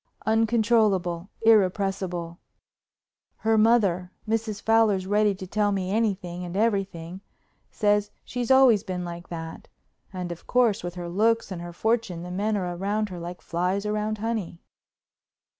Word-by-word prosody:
"Uncontrollable, 215 -5 +2
irrepressible. 190 -5 +1 1.0
Her 220 0 +1
mother—Mrs. 215 0 +1
Fowler's 220 -4 +3
ready 205 +1 +2
to 190 0 -8
tell 205 +2 0
me 190 -2 -2
anything 195 -5 -1
and 175 +1 -5
everything—says 200 +1 -2 0.2
she's 245 0 -4
always 260 -6 +6
been 180 -3 -4
like 175 0 -8
that. 165 -1 -7 0.4
And, 180 -2 -5
of 170 - -9
course, 240 -7 +2
with 175 0 -5
her 175 -1 -5
looks 220 +4 +1
and 175 -2 -5
her 175 0 -7
fortune 220 -2 -1
the 180 - -7
men 205 +3 0
are 180 -2 -3
around 205 +4 -1
her 180 -2 -7
like 175 +1 -7
flies 180 +4 -1
round 210 +1 -1
honey." 215 -6 -4
200 Hz, 135 wpm, -25 LUFS, 180-220 Hz, 1.0 s, always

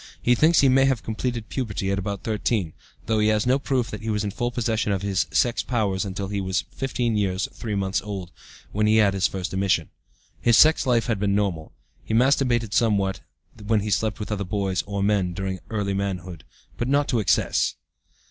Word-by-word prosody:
He 125 - +3
thinks 160 +7 +4
he 140 - +5
may 135 +1 +5
have 135 -4 +1
completed 115 0 -3
puberty 100 -6 -2
at 100 - 0
about 100 0 -4
13, 105 -6 -1 0.3
though 110 -1 +1
he 105 - +3
has 110 -1 +2
no 130 +3 +3
proof 130 -4 -1
that 105 - -6
he 110 - -4
was 105 -1 0
in 100 - -2
the - - -18
full 120 -1 -1
possession 115 -3 -1
of 100 -1 -1
his 100 -1 0
sex 120 -1 +1
powers 105 -6 -1
until 95 0 -4
he 100 -1 -2
was 95 -1 -1
15 125 -4 -1
years 95 -2 0
3 110 -3 -4
months 95 -1 0
old 95 -3 -6 0.4
(when 105 +1 +1
he 110 - +4
had 105 -3 +4
his 95 0 +2
first 95 0 -5
emission). 95 -1 0 0.5
His 120 -2 +4
sex 155 -3 +5
life 120 -2 +2
has 115 -5 -1
been 100 0 +1
normal. 95 -7 -2 0.3
He 110 - -2
masturbated 120 -3 +2
somewhat 100 -5 +1 0.5
when 110 -2 +2
he 105 +1 -3
slept 110 +1 0
with 105 0 -5
other 100 -1 -1
boys 95 -1 -1
(or 100 -1 -2
men) 100 -3 +1
during 95 0 -4
early 105 -3 -1
manhood, 95 -4 -4 0.3
but 120 - -2
not 140 +2 +2
to 125 -5 +1
excess. 105 - +1
105 Hz, 210 wpm, -24 LUFS, 95-120 Hz, 0.5 s, he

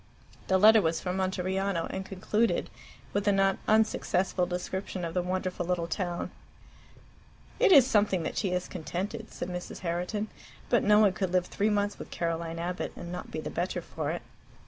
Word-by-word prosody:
The 190 - +4
letter 215 +3 +7
was 165 -2 0
from 180 0 -3
Monteriano, 190 -1 0
and 190 - -3
concluded 205 +4 0 0.4
with 205 +1 0
a - - +6
not 195 -1 +2
unsuccessful 195 -4 +2
description 180 0 -3
of 165 - -4
the 180 - +1
wonderful 185 0 -2
little 175 -1 0
town. 175 0 -3 1.3
"It 465 -4 +5
is 280 -8 +9
something 205 -7 +2
that - - -3
she 200 - 0
is 180 0 -1
contented," 195 +6 -5
said - - -5
Mrs. 180 0 -6
Herriton. 180 +5 -2 0.4
"But 240 - +4
no 210 0 +5
one 210 -3 +5
could 190 -2 -2
live 180 -1 +2
three 205 +3 0
months 205 -1 0
with - - -8
Caroline 165 -1 -2
Abbott 175 +2 -3
and 175 - -7
not 180 - -6
be - - -4
the - - -5
better - - -1
for - - -4
it." - - -3
185 Hz, 180 wpm, -29 LUFS, 180-205 Hz, 1.3 s, is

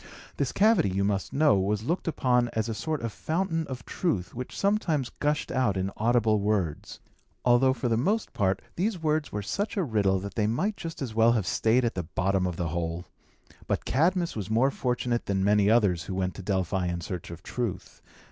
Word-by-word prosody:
This 140 -3 0
cavity, 210 - +4
you 95 +1 0
must 100 -1 -1
know, 145 -8 +4
was 105 +2 0
looked 170 +9 -2
upon 125 -6 +2
as 110 0 -1
a 115 - -2
sort 130 +7 -3
of 115 - -2
fountain 165 -1 -1
of 130 -2 -7
truth, 95 - -2
which 125 +1 -6
sometimes 170 - +1
gushed 150 0 0
out 125 -7 +1
in 95 +1 -1
audible 110 -1 +2
words; 100 -7 -1 0.5
although, 125 +2 +5
for 125 -1 -2
the 115 -1 +2
most 205 - 0
part, 95 -2 0
these 200 +3 0
words 155 -1 0
were 105 0 -3
such 205 - -2
a 195 - +2
riddle 105 - +2
that 100 0 -6
they 105 0 +1
might 190 - 0
just 165 -6 -6
as 120 -5 -5
well 115 +1 +5
have 110 -6 0
stayed 115 +5 +2
at 115 - 0
the 90 - -2
bottom 90 +3 0
of 90 - -3
the 85 -1 -2
hole. 85 +1 -3 0.6
But - - -1
Cadmus 170 +4 +1
was 105 -2 -4
more 120 +5 +3
fortunate 125 -2 -1
than 95 -1 0
many 105 0 +4
others 100 -8 +3
who 95 - -4
went 95 -1 -1
to - - -8
Delphi 95 -1 -1
in 85 0 -2
search 90 +2 -6
of 85 0 -9
truth. 100 -7 -4
110 Hz, 205 wpm, -27 LUFS, 95-140 Hz, 0.6 s, although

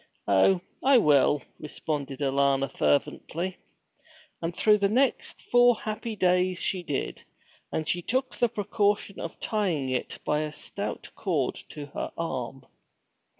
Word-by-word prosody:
'Oh, 100 - +4 0.2
I 270 0 +6
will!' 145 - +4 0.2
responded 145 -2 -4
Alanna 140 0 +2
fervently. 170 +6 0 0.8
And 170 +1 -3
through 210 -1 +5
the 200 0 +2
next 255 +4 0
four 245 0 +5
happy 215 +1 -4
days 180 -1 +2
she 185 +1 0
did, 145 -5 -3 0.5
and 155 - -1
took 250 +11 0
the 240 - +3
precaution 205 -2 0
of 165 - -6
tying 180 -11 -1
it 130 -1 -2
by 150 - +1
a 155 0 -2
stout - - -5
cord - - 0 0.2
to 150 -2 -7
her - - -3
arm. 130 -5 -4
170 Hz, 130 wpm, -27 LUFS, 140-210 Hz, 0.8 s, I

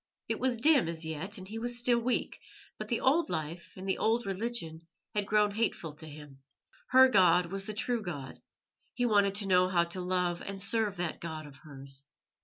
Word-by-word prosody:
It - - -2
was 255 -2 +1
dim 275 - +4
as 165 -1 -4
yet, 160 +7 -4
and 185 -1 -8
he 220 +3 -5
was 240 +1 0
still 240 0 +3
weak; 240 +1 -1 0.4
but 215 - -5
the 230 +1 0
old 310 +6 +3
life 165 0 -4
and 190 +1 -7
the 190 - 0
old 230 +2 +1
religion 190 -5 -4 0.3
had 205 -1 -1
grown 210 -1 +3
hateful 200 -7 -2
to 160 - -10
him. 145 -2 -12 0.5
Her 260 +1 +8
God 180 -6 +4
was 195 +1 -2
the 215 - -5
true 235 +2 -1
God; 145 -9 -7 0.5
he 245 - 0
wanted 200 -3 +3
to 200 -1 +1
know 185 -1 +4
how 175 -2 +2
to 170 +2 -4
love 180 -1 -1
and 195 0 -6
serve 210 0 0
that 175 -2 -3
God 160 -2 -6
of 140 -2 -13
hers. 135 -2 -6
195 Hz, 205 wpm, -30 LUFS, 165-225 Hz, 0.5 s, Her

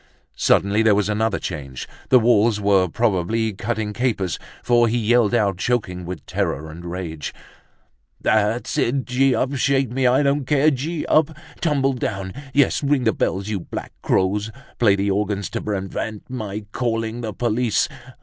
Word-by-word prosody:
Suddenly 100 +2 +3
there 110 -2 +4
was 105 0 +1
another 105 -1 +1
change, 70 -7 -6 0.2
the 130 - +7
walls 115 -2 +3
were 100 -2 +3
probably 110 +3 0
cutting 105 +1 -3
capers, 105 -7 -1 0.2
for 120 -1 +4
he 115 +2 0
yelled 120 0 +3
out, 100 -5 +1
choking 90 -8 -1
with 90 -4 -6
terror 80 +3 -2
and 85 +2 -10
rage: 85 -3 -5 0.8
"That's 110 +2 +1
it, 130 +2 +1
gee 130 +1 +2
up! 135 +2 0
Shake 135 -2 +1
me, 130 0 +2
I 130 +4 +4
don't 140 0 +1
care! 150 +1 +4
Gee 150 +4 -3
up! 155 0 +2 0.2
Tumble 140 -4 +1
down! 95 -6 -3 0.2
Yes, 140 -1 +3
ring 140 -2 +1
the 110 - +2
bells, 95 +1 -1
you 105 -2 -2
black - - -7
crows! 100 +3 +1 0.3
Play 105 -5 +5
the 100 0 0
organ 100 0 -1
to - - -4
prevent 105 +1 -4
my 105 -4 -5
calling 115 -1 -2
the 110 -2 -3
police. 115 +1 +1
110 Hz, 160 wpm, -22 LUFS, 100-125 Hz, 0.8 s, the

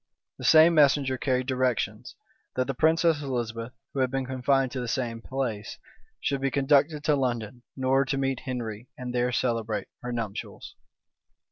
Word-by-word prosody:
[*] - - -64
The - - -5
same 160 +1 +7
messenger 140 -3 +4
carried 130 -1 0
directions, 130 -2 -1 0.4
that 130 - +1
the 135 - -2
princess 160 +2 +3
Elizabeth, 120 -3 -3 0.2
who 140 - -3
had 130 -1 +2
been 135 0 -2
confined 130 0 +1
to 130 - -4
the 125 - -3
same 115 -2 -2
place, 120 -5 -4 0.4
should 140 -1 -1
be 135 - +1
conducted 145 +2 +2
to 150 -1 +3
London, 120 -3 -2 0.2
in 130 - -5
order 135 +1 +3
to 135 +1 -1
meet 135 -1 0
Henry, 120 -3 -5
and 125 -1 -5
there 125 0 +1
celebrate 115 -3 -1
her 125 - -4
nuptials. 115 -4 -5
130 Hz, 170 wpm, -27 LUFS, 120-135 Hz, 0.4 s, same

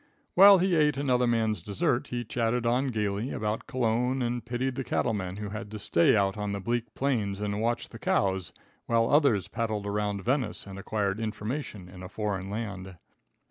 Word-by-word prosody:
While 200 +1 +9
he 185 0 +2
ate 150 -3 +3
another 125 -3 +2
man's 110 -5 +1
dessert, 100 +6 0
he 120 -1 -4
chatted 115 +2 0
on 125 +4 +2
gaily 105 0 -1
about 105 -2 -3
Cologne 125 +1 0
and 120 -1 -2
pitied 125 +2 -2
the 135 - -3
cattle 120 - 0
man 95 -3 -3
who 105 -1 -5
had 105 +1 -6
to 110 - -6
stay 85 -3 +3
out 100 -1 +1
on 105 -1 -2
the 100 - -3
bleak 115 +3 -2
plains 110 -8 0
and 105 0 -2
watch 120 +1 -1
the - - -11
cows, 95 -5 0 0.4
while 115 -1 +3
others 140 - +4
paddled 110 -3 -2
around 105 -1 -2
Venice 130 -1 -1
and 100 -1 -8
acquired 100 0 -1
information 110 -2 -4
in 90 0 -12
a 90 - -8
foreign 100 -2 -3
land. 100 -4 -5
110 Hz, 185 wpm, -28 LUFS, 100-125 Hz, 0.4 s, While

